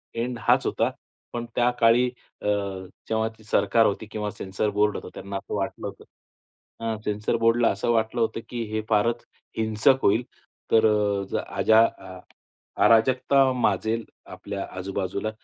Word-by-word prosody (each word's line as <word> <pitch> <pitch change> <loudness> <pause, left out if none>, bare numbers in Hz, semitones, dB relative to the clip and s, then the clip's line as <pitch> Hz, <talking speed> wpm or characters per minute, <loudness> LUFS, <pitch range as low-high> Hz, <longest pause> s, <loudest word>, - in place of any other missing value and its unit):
End 120 +1 -3
हाच - - +3
होता. - - 0 0.4
पण 120 0 -3
त्या 120 0 +3
काळी 115 +2 +5 0.4
अ, - - -4 0.6
जेव्हा 110 0 +1
ती 110 - -19
सरकार 110 +2 +3
होती 105 +1 -1
किंवा 105 -1 -3
सेन्सर 95 +1 -3
बोर्ड 105 +1 +2
होतं, - - -8
त्यांना 100 0 -7
असं 95 - -6
वाटलं 100 -1 -3
होतं. 435 - -10 0.8
अ, 115 -1 -2
सेन्सर 105 +2 -1
बोर्डला 115 +1 +3
असं 100 +4 -1
वाटलं 115 +1 0
होतं, 115 0 0
की 120 -1 -3
हे 110 0 -1
फारच 115 +2 +1 0.3
हिंसक 110 +4 +3
होईल. 110 +5 +3 0.5
तर, 110 - +5 0.5
अ, - - +2 0.2
अजा 110 0 +5 1.0
अराजकता 130 +3 +4
माजेल 115 -2 0 0.3
आपल्या 100 -1 -5
आजूबाजूला, 95 +2 -3
110 Hz, 145 wpm, -25 LUFS, 105-115 Hz, 1.0 s, काळी